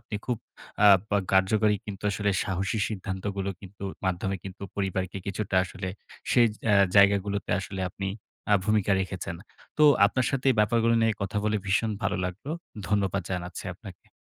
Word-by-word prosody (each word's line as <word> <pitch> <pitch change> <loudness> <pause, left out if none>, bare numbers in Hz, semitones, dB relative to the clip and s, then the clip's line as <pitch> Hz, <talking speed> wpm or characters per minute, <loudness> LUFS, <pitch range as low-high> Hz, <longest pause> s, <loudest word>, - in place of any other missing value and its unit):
আপনি 110 - -9
খুব 125 - 0 0.5
আ - - +9 0.2
পা 105 - +1 0.2
কার্যকরী 105 +2 +3
কিন্তু 100 -2 -7
আসলে 100 0 0
সাহসী 95 +3 -1
সিদ্ধান্তগুলো 100 -1 -3
কিন্তু, 100 0 -10 0.2
মাধ্যমে 95 +1 -1
কিন্তু 95 +1 -9
পরিবারকে 95 -1 -2
কিছুটা 100 0 -2
আসলে 95 0 -6 0.4
সেই 120 - +6 0.3
আ - - +6 0.2
জায়গাগুলোতে, 100 0 +3
আসলে 95 0 -6
আপনি 95 +2 -4 0.4
আ - - +8
ভূমিকা 105 -1 +2
রেখেছেন, 95 -3 -4 0.4
তো 150 - +6 0.2
আপনার 130 +4 0
সাথে 135 -1 -2
এই 125 - +1
ব্যাপারগুলো 115 +2 +3
নিয়ে 115 -1 +3
কথা 100 +1 -3
বলে 110 0 +1
ভীষণ 100 +3 +1
ভালো - - 0
লাগলো, 95 +10 -5 0.4
ধন্যবাদ 100 -2 +1
জানাচ্ছি 90 -1 -4
আপনাকে। - - -13
100 Hz, 155 wpm, -27 LUFS, 95-105 Hz, 0.5 s, আ